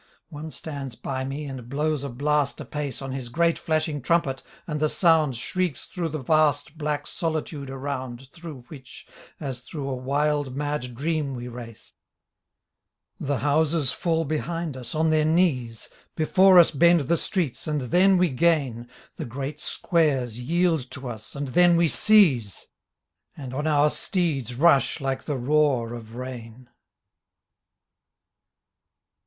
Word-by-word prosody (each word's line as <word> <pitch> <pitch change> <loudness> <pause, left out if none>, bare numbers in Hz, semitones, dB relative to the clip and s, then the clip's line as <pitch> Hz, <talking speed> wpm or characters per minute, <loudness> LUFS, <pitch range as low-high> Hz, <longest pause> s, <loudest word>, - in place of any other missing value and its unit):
One 155 0 -7
stands 140 -5 -6
by 130 +1 -4
me 140 +3 -4
and 130 -4 -7
blows 150 +1 -1
a 140 - -4
blast 145 +2 0
apace 145 -3 -5
On 135 - -5
his 130 -2 -5
great 170 +6 +1
flashing 155 -3 -1
trumpet 135 -2 +1 0.2
and 150 -1 -3
the 155 0 +2
sound 160 -8 +3
Shrieks 180 +2 -2
through 170 -3 -4
the 155 - -4
vast 150 +1 +1
black 150 -2 -2
solitude 155 -5 -3
around 135 -2 -5
Through 165 -5 -10
which, 130 -4 -12 0.3
as 135 -5 -4
through 135 +3 -7
a 135 - -2
wild 140 +1 -1
mad 145 -4 -3
dream 150 0 -1
we 120 0 -6
race. 120 -2 -10 1.3
The 140 0 -1
houses 150 -1 +2
fall 165 -1 0
behind 155 +1 -3
us 125 0 -7
on 160 +1 +2
their 155 -1 +3
knees. 150 -9 +1 0.3
Before 185 +4 +5
us 170 - +7
bend 170 +3 +5
the 155 +5 +1
streets 170 - -2
and 150 -1 0
theiTjwe 180 +2 +3
gain, 135 -7 +1 0.3
The - - -4
great 140 +5 -5
squares 135 -9 0
yieled 160 0 +1
to 130 -2 -5
us 110 +1 -7
and 140 0 -3
theit|we 170 +3 +4
seize 155 - +3 0.3
— - - -45
And 130 -3 -7
on 150 +4 -2
our 150 -1 +3
steeds 145 - -1
rush 145 +1 +4
like 135 -1 -3
the 145 -3 -2
roar 130 -3 +1
of 115 -1 -9
rain. 125 -1 -8
145 Hz, 145 wpm, -25 LUFS, 130-160 Hz, 1.3 s, us